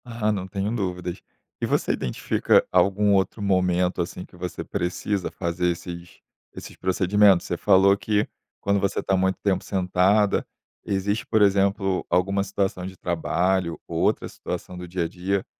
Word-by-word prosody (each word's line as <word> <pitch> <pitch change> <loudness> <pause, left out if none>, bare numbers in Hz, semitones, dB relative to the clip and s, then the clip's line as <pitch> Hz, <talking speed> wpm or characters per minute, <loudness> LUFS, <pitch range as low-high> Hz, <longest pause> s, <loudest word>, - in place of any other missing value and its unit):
Aham, 115 -3 -1
não 95 -3 -3
tenho 100 +2 -2
dúvidas. 90 -4 -3 0.4
E - - +1
você - - +1
identifica 65 - +1
algum 100 +3 +3
outro 95 +2 +1
momento, 90 -2 +1
assim, 90 +1 -5
que - - -19
você 90 0 -5
precisa 90 +2 -2
fazer 90 0 -2
esses 85 0 -6 0.3
esses - - -10
procedimentos? 95 +1 +3
Você - - -1
falou 95 +1 +5
que, 105 0 0 0.3
quando 100 0 +1
você 100 0 0
está 95 - 0
muito 95 0 +1
tempo 100 -2 0
sentada, 95 +2 +2 0.4
existe, 100 +2 -1
por 110 -1 +1
exemplo, 100 -1 +2
alguma 95 +3 +1
situação 95 -2 -2
de 95 0 -8
trabalho 90 +1 0
ou - - -3
outra - - +1
situação 90 - -6
do 90 - -6
dia 90 0 -2
a - - -1
dia 95 +3 -2
95 Hz, 160 wpm, -24 LUFS, 90-100 Hz, 0.4 s, falou